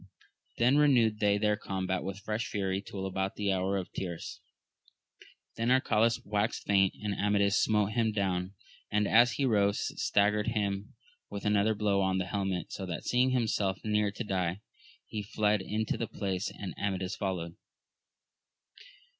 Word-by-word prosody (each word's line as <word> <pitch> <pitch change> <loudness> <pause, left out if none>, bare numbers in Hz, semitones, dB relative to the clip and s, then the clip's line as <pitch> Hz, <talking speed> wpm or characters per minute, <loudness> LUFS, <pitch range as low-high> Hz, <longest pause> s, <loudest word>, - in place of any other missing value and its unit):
Then 125 +4 +4
renewed 120 -7 +4
they 105 -1 +3
their 105 0 +2
combat 95 -2 -3
with 95 0 -4
fresh 110 +3 -2
fury 95 -1 -1
till 100 -1 -6
about 95 0 -2
the 100 -1 0
hour 95 +1 0
of 95 - -5
tierce, 85 -3 -5 1.2
then 115 +1 0
Arcalaus 115 -3 +2
waxed 105 +1 -1
faint, 95 -2 +3
and 105 -1 -1
Amadis 100 0 +2
smote 105 -1 +2
him 115 -1 +1
down; 95 -2 -1 0.4
and, 105 0 +2
as 120 +3 +5
he 140 - 0
rose, 100 -4 +2
staggered 105 +1 +2
him 100 -2 -2 0.3
with 100 - -6
another 105 +1 +3
blow 100 -1 +1
on 95 0 +1
the 90 - -1
helmet, 95 -2 -2
so 95 - -5
that 85 - -5
seeing 125 +1 +3
himself 110 -6 0
near 105 -1 +2
to 105 +4 -5
die, 95 -2 -2 0.4
he 105 - -5
fled 105 0 +1
into 110 +3 -2
the 115 - -2
palace, 95 -1 -3
and 100 - -7
Amadis 95 -1 -2
followed. 90 -4 -3
100 Hz, 155 wpm, -30 LUFS, 95-105 Hz, 1.2 s, as